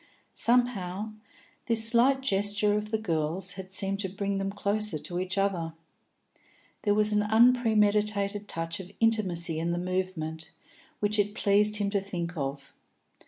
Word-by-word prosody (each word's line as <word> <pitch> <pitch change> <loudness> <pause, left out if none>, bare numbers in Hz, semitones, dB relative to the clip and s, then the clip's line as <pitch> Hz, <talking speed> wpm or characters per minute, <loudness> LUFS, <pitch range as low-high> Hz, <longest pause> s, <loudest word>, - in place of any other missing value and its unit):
Somehow, 220 -4 +1 0.5
this 225 -1 +5
slight 255 +4 +4
gesture 205 -3 +1
of 210 0 -3
the 220 - 0
girl's 175 -1 -1
had 190 -1 -8
seemed 195 +1 0
to 195 -2 -2
bring 200 +1 -3
them 195 0 -2
closer 205 -3 0
to 165 +4 -4
each 185 +1 -3
other; 180 -5 -1 1.1
there 205 -2 +1
was 210 0 +2
an 210 - +3
unpremeditated 210 -3 +2
touch 165 +1 -4
of 185 -1 -9
intimacy 180 -8 +1
in 165 +1 -2
the - - -2
movement, 180 -3 -3 0.5
which 210 +1 +1
it 205 +1 0
pleased 210 +1 +2
him 205 -1 0
to 200 -1 0
think 175 -3 -5
of. 140 -2 -5
200 Hz, 150 wpm, -28 LUFS, 180-210 Hz, 1.1 s, this